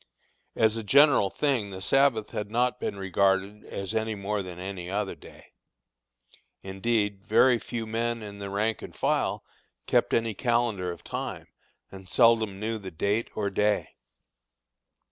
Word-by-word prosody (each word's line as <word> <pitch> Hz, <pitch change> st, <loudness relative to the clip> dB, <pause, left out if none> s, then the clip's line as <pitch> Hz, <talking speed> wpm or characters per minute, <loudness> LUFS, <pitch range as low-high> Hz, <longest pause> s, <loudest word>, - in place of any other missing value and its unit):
As 110 Hz, 0 st, +3 dB
a 115 Hz, -, -4 dB
general 140 Hz, -2 st, +5 dB
thing 125 Hz, -4 st, 0 dB
the 95 Hz, -1 st, -7 dB
Sabbath 115 Hz, +1 st, +2 dB
had 105 Hz, -1 st, -4 dB
not 125 Hz, +3 st, +1 dB
been -, -, -3 dB
regarded 95 Hz, +2 st, +1 dB
as 100 Hz, +2 st, -5 dB
any 110 Hz, -1 st, -1 dB
more 100 Hz, +1 st, -2 dB
than 90 Hz, -2 st, -8 dB
any 90 Hz, -1 st, -6 dB
other 100 Hz, 0 st, -2 dB
day. -, -, -16 dB, 1.1 s
Indeed, 100 Hz, 0 st, -1 dB
very 120 Hz, +2 st, +4 dB
few 115 Hz, -1 st, -5 dB
men 115 Hz, +1 st, -2 dB
in 100 Hz, -1 st, -9 dB
the 100 Hz, -1 st, -5 dB
rank 105 Hz, +3 st, -1 dB
and -, -, -9 dB
file -, -, 0 dB, 0.4 s
kept -, -, +2 dB
any 115 Hz, -1 st, 0 dB
calendar 115 Hz, -7 st, 0 dB
of 85 Hz, -, -10 dB
time, -, -, -5 dB, 0.4 s
and 95 Hz, -1 st, -11 dB
seldom 110 Hz, -5 st, +4 dB
knew 110 Hz, +1 st, -2 dB
the 95 Hz, -2 st, -7 dB
date 100 Hz, +7 st, -1 dB
or 100 Hz, -2 st, -1 dB
day. 105 Hz, +1 st, +1 dB
105 Hz, 150 wpm, -27 LUFS, 100-115 Hz, 1.1 s, general